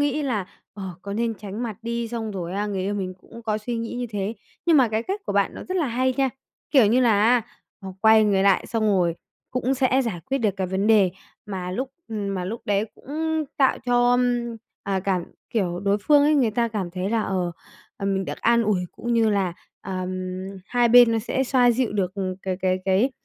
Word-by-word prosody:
nghĩ 290 +1 +1
là, 220 -9 -1 0.3
ờ, 200 - -8 0.2
có 200 - -5
nên 230 +1 -1
tránh 205 +3 -6
mặt 220 -4 -4
đi, 235 0 -2
xong 225 -2 -4
rồi 180 -3 -5
á 205 +1 -1
người 200 -2 -2
yêu 200 +2 -1
mình 185 -2 -3
cũng 235 - -13
có 215 -1 -1
suy 235 +3 -4
nghĩ 230 0 -4
như 245 0 -3
thế. 205 +1 -2 0.3
Nhưng 335 -2 +6
mà 260 -4 +5
cái 220 +1 -1
cách 390 - -3
của - - -1
bạn - - +1
nó - - -7
rất 370 - -1
là 325 -6 +1
hay 255 +2 0
nha, 270 -1 +2 0.4
kiểu 260 -8 +6
như 240 +5 +3
là 225 -5 +4
á, 240 0 +4 0.4
à, 190 - -7
quay 220 0 +6
người 195 -2 +3
lại 195 -1 +3
xong 225 -2 0
rồi 180 -5 +2 0.4
cũng 255 +1 0
sẽ 265 0 +2
giải 215 -9 -3
quyết 270 +1 0
được 220 -5 +2
cái 190 -1 -1
vấn 190 +3 -1
đề 205 -5 +5 0.4
mà 185 -3 -4
lúc 255 +8 -3 0.2
ừm, 205 -3 -3
mà 180 -1 -3
lúc 220 +6 -4
đấy 205 0 +1
cũng 315 +2 -2
tạo 270 -2 +3
cho, 245 0 +3
ưm, 245 -1 +1 0.3
à, 195 -1 -1
cảm 185 -2 0 0.3
kiểu, 180 -6 -1
đối 200 +1 +1
phương 290 +6 +4
ấy, 300 +1 +4
người 255 -6 +3
ta 235 +2 0
cảm 205 -5 -3
thấy 185 +3 -3
là, 230 -1 +1
ờ, 185 -3 -1 0.4
à, 200 - -6
mình 195 -1 0
được - - -6
an 235 0 +4
ủi 210 -4 +1
cũng 240 0 -4
như 225 -1 +3
là, 195 -4 +1 0.3
ờm, 185 -1 -4 0.6
hai 245 -1 +2
bên 240 -1 +8
nó 225 - +2
sẽ 260 +4 -1
xoa 250 -2 +4
dịu 240 -1 0
được, 190 -3 -1
ừm, 190 -2 -2
cái 190 -1 -2
cái 185 0 +2
cái, 195 +8 +3
220 Hz, 235 wpm, -24 LUFS, 195-245 Hz, 0.6 s, bên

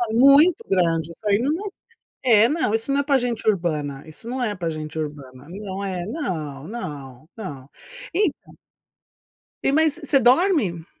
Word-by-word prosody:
Ô 230 -2 -1
muito 280 +7 +6
grande 165 -3 +1
isso 210 +6 -13
aí 200 0 +4
não 280 +6 0 0.7
é, 225 -4 +6
é 230 - +4
não 300 -9 0
isso 225 +5 0
não 280 - +2
é - - +2
para 275 -2 +3
gente 240 -3 -2
urbana, 155 -8 -1
isso 160 +9 -10
não 255 +1 -3
é 210 -3 -1
para 170 -2 -2
gente 155 0 -6
urbana, 145 -2 -7
não 195 +1 -6
é 180 -3 -3
não, 160 - -4
não, 145 - -8
não, 145 - -8 0.4
então 380 -5 -1 1.1
E, - - +2
mas, 310 0 +3
você 295 -4 +2
dorme? 245 - +3
205 Hz, 170 wpm, -23 LUFS, 155-260 Hz, 1.1 s, muito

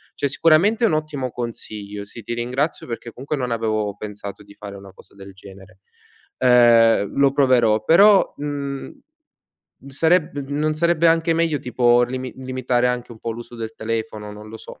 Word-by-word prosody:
cioè 140 - -1
sicuramente 165 - +3
è - - +5
un - - 0
ottimo 150 -4 -2
consiglio, 105 -4 -7
sì, 105 +3 -11
ti 120 - -5
ringrazio 125 +7 -2
perché 120 0 -6
comunque 135 +6 -5
non 125 -2 -3
avevo 110 -3 -1
pensato 105 -1 -8
di 100 0 -16
fare 100 -1 -9
una 100 -1 -13
cosa 95 - -19
del 100 0 -12
genere. 95 0 -15 0.6
Ehm, 115 -4 +4
lo 140 -1 +4
proverò, 120 -6 +3
però, 195 - +5
mhmm, 140 -2 -5 0.9
sareb 160 +2 +1
non 150 +2 -1
sarebbe 170 +1 +2
anche 165 0 +3
meglio 165 -3 0
tipo 120 -1 +3
limi 130 +1 -4
limitare 130 -1 -1
anche 125 -1 -4
un 110 - -15
po' 115 - -4
l'uso 120 +1 -9
del 115 -1 -6
telefono? 110 -2 -4
Non 105 +1 -11
lo 110 - -9
so. - - -13
120 Hz, 170 wpm, -21 LUFS, 110-145 Hz, 0.9 s, è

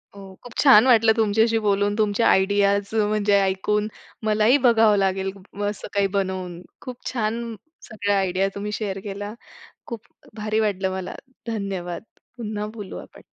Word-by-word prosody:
हो, 195 -1 -11
खूप 245 - -11
छान 260 -5 +7
वाटलं 225 -2 +6
तुमच्याशी 225 +1 +2
बोलून. 205 0 +2
तुमच्या 215 +1 +2
आयडियाज 200 +1 +2
म्हणजे 210 -1 +2
ऐकून 200 +2 0 0.4
मलाही 215 +5 +4
बघावं 225 -3 +5
लागेल 195 0 0 0.2
मग 205 0 -3
असं 210 - -7
काही 200 -1 +2
बनवून 185 -2 -3 0.2
खूप 250 -1 -9
छान, 230 -1 -2 0.3
सगळ्या 205 -2 -1
आयडिया 190 0 0
तुम्ही 205 +1 -4
शेअर 200 -2 -3
केल्या. 205 +1 -6 0.5
खूप 230 -2 -6 0.3
भारी 215 0 -1
वाटलं 195 -3 0
मला. 190 -1 -5 0.3
धन्यवाद! 195 -6 -4 0.4
पुन्हा 210 -2 -4
बोलू 205 -4 -7
आपण. - - -12
205 Hz, 145 wpm, -23 LUFS, 195-220 Hz, 0.5 s, छान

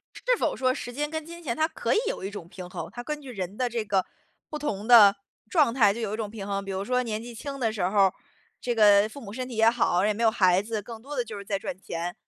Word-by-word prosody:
是 - - +1
否 - - 0
说 255 -1 +2
时 245 -1 -6
间 295 +4 -2
跟 315 -1 -4
金 340 +1 -10
钱 240 -7 -3
它 315 - +2
可 - - -2
以 - - +3
有 - - -4
一 195 - -3
种 185 -5 -8
平 180 0 -9
衡？ - - -6
它 240 - -6
根 300 +2 -4
据 270 -3 -10
人 190 -1 -5
的 250 -1 0
这 230 -2 -2
个 195 -3 +1 0.4
不 300 - -5
同 215 -8 -3
的 210 -5 +8 0.3
状 290 -9 +3
态 210 -6 +5
就 230 - -6
有 215 -2 -2
一 - - -2
种 215 -2 -4
平 205 -3 -7
衡。 200 0 -2
比 195 - -6
如 190 +1 -3
说 250 +1 +1
年 220 -2 -3
纪 235 0 -9
轻 275 +3 -6
的 225 -4 0
时 210 -4 -3
候 190 +4 +1
儿， 185 - -1 0.5
这 240 -1 -1
个 205 -1 +6
父 280 - -10
母 205 -5 -9
身 255 +2 -5
体 240 - -7
也 225 0 +5
好， 205 -5 +2
也 215 - +2
没 230 - -3
有 225 - +5
孩 185 -2 +3
子， 220 0 -3
更 225 +1 -10
多 290 +2 -7
的 245 - 0
就 215 -2 -8
是 200 - -8
在 195 -1 -1
赚 210 - -5
钱。 170 0 -4
225 Hz, 320 characters per minute, -26 LUFS, 200-250 Hz, 0.5 s, 的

